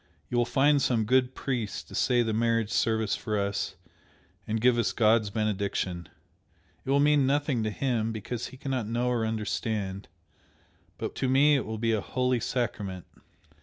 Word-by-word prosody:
You 120 - 0
will 120 - +3
find 140 +3 +3
some 120 -4 +2
good 130 +2 +2
priest 120 -6 -3
to - - -13
say 125 -2 +2
the 110 -1 -1
marriage 115 -1 +1
service 110 -2 +1
for 105 -1 -3
us 100 -1 -2 0.7
and 110 +1 -1
give 120 +1 +3
us 95 -5 +1
God's 110 0 +3
benediction 100 -4 -2 0.7
it - - -8
will 140 +1 +4
mean 145 -2 +4
nothing 140 -3 +1
to 110 - 0
him, 115 -1 -1
because 115 +2 -4
he 130 - -12
cannot 130 -4 -3
know 120 +2 0
or 115 -2 0
understand, 105 -2 -3 0.9
but - - -4
to 130 - 0
me 145 +3 +5
it 135 - -1
will 110 0 -4
be 115 +1 0
a 110 -2 +1
holy 125 +1 0
sacrament!" 105 -7 -3
115 Hz, 170 wpm, -28 LUFS, 105-130 Hz, 0.9 s, me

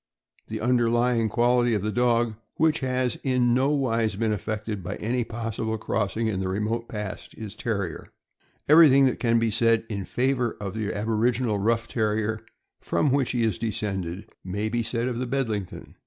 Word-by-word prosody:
The - - -5
underlying 120 -1 +2
quality 120 +1 +3
of 100 - -2
the 110 - -1
dog, 120 0 +2 0.2
which 160 0 +3
has 130 -1 -1
in 125 -3 +2
nowise 125 -5 +1
been 110 +1 0
affected 105 0 -4
by 90 +3 -5
any 120 +3 -1
possible 110 -1 -3
crossing 110 0 -1
in 105 -4 -1
the 95 - -2
remote 105 +5 -2
past, 105 -3 -6
is 105 -3 -7
Terrier. 100 -8 -3 0.6
Everything 145 -3 +7
that 130 - 0
can 115 -1 +2
be 115 -1 +1
said 115 0 +2
in 100 -3 -3
favor 125 0 0
of 100 -2 -5
the 110 -2 -2
aboriginal 110 +1 0
rough 115 +3 +1
Terrier, 110 0 -1 0.4
from 145 - 0
which 135 -2 +1
he 120 -2 0
is 110 -5 0
descended, 100 -5 -3 0.2
may 100 +4 -2
be 120 +1 0
said 115 +1 -1
of 120 -2 -2
the 130 - -2
Bedlington. 115 -8 -3
115 Hz, 170 wpm, -25 LUFS, 105-125 Hz, 0.6 s, Everything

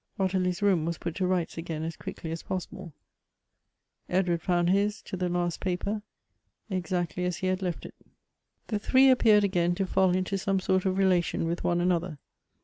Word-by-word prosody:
Ot 190 -1 +1
tilie's 185 0 0
room 190 -6 +3
was 170 0 -2
put 170 - -4
to 185 -2 +1
rights 180 -3 -1
again 165 -2 -4
as 165 0 -4
quickly 160 - -7
as 165 - -4
possi 185 -2 -4
ble; 185 -3 -9 1.2
Edward 175 -2 +1
found 175 0 +2
his, 205 +2 +1
to - - -6
the 180 -1 -1
last 175 -1 -1
paper, 195 +3 -2 0.7
exactly 180 -1 -2
as 180 -1 -1
he - - -4
had 185 +1 0
left 180 -3 -3
it. - - -9 0.7
The 215 -3 -2
three 260 +5 +5
appeared 220 -5 +5
again 175 -3 +1
to 195 - -1
fall 185 -1 +2
into 185 +1 -1
some 195 0 0
sort 185 0 +1
of 185 - +1
rela 190 -2 +3
tion 165 - -2
with 170 +1 -2
one 175 0 +1
another. 175 -2 0
180 Hz, 195 wpm, -28 LUFS, 175-190 Hz, 1.2 s, three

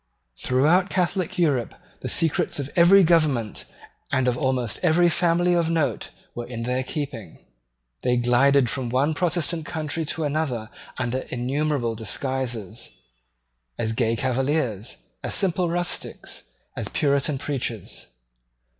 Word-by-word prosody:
Throughout 160 +9 +3
Catholic 180 -1 -1
Europe 145 -9 +1 0.2
the - - -4
secrets 165 -2 +1
of 140 -1 -4
every 185 +3 +7
government 155 - +2 0.5
and 130 -1 +1
of 125 - +2
almost 125 -2 -1
every 175 0 +4
family 175 +1 +2
of 170 -2 +2
note 160 -3 0 0.2
were 120 0 -6
in 120 -2 -5
their 125 +2 -1
keeping. 130 - -5 0.6
They 125 0 +1
glided 125 +2 +4
from 125 0 -2
one 135 +6 +1
Protestant 170 -1 -1
country 160 -1 -3
to 160 +2 -3
another 140 -7 -2 0.3
under 125 +2 -1
innumerable 130 0 -1
disguises, 120 -1 -2 0.9
as 110 -1 -1
gay 115 0 +1
Cavaliers, 130 -3 -1 0.2
as - - 0
simple 180 -2 +2
rustics, 175 +1 -3 0.3
as - - -4
Puritan 140 0 +1
preachers. 125 -7 -4
140 Hz, 125 wpm, -24 LUFS, 120-165 Hz, 0.9 s, every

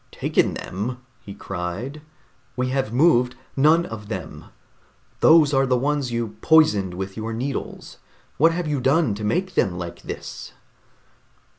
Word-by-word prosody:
"Taken - - 0
them!" 110 +7 -4 0.2
he 100 -3 -11
cried. 105 - -5 0.5
"We 125 0 -1
have 130 -4 -1
moved 125 -2 +3 0.2
none 155 +5 +4
of 105 -2 -8
them! 110 - -6 0.7
Those 155 -3 +6
are 135 0 +3
the 125 0 +2
ones 140 -1 -1
you 115 -3 -3
poisoned 105 - +4
with 95 +1 -5
your 110 +1 -4
needles. 130 +4 -5 0.4
What 165 +4 +5
have 175 +1 -2
you 145 -3 -1
done 135 -2 +2
to 105 +2 -6
make 180 - -1
them 90 - +1
like 85 -1 -7
this?" - - -8
125 Hz, 145 wpm, -23 LUFS, 105-150 Hz, 0.7 s, Those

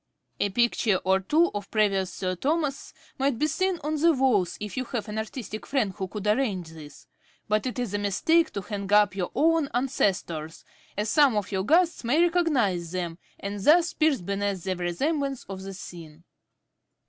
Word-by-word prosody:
A 205 - +1
picture 230 -1 +2
or 190 +1 +3
two 315 - +2
of 205 -1 -5
previous 195 -4 +1
Sir 185 -1 -3
Thomas's 290 - -1 0.3
might 270 -2 +1
be 300 - +1
seen 375 +4 0
on 305 +1 -1
the 335 0 +5
walls, 250 - +1
if 210 -1 -6
you 260 - -1
have 235 -3 -4
an 215 +1 -3
artistic 220 -1 -6
friend 245 -9 0
who 190 +1 -4
could 205 +1 -7
arrange 210 -6 0
this; 155 -2 -12 0.4
but 215 +2 +1
it 250 - -4
is 245 -5 -3
a 205 - 0
mistake 320 - +2
to 200 - -3
hang 200 0 -5
up 205 -1 +5
your 180 -3 -2
own 325 -2 +3
ancestors, 185 - -1 0.3
as 210 +1 -1
some 270 -1 +4
of 205 -1 -2
your 190 -1 -1
guests 335 - +2
may 250 +7 +2
recognise 290 - +2
them, 175 -2 -3 0.2
and 200 +1 -5
thus 335 +5 +5
pierce 305 - +2
beneath 200 0 -2
the 190 - -1
vraisemblance 270 - -2
of 190 -1 -7
the 195 0 -7
scene. 165 -3 -11
210 Hz, 185 wpm, -26 LUFS, 190-280 Hz, 0.4 s, the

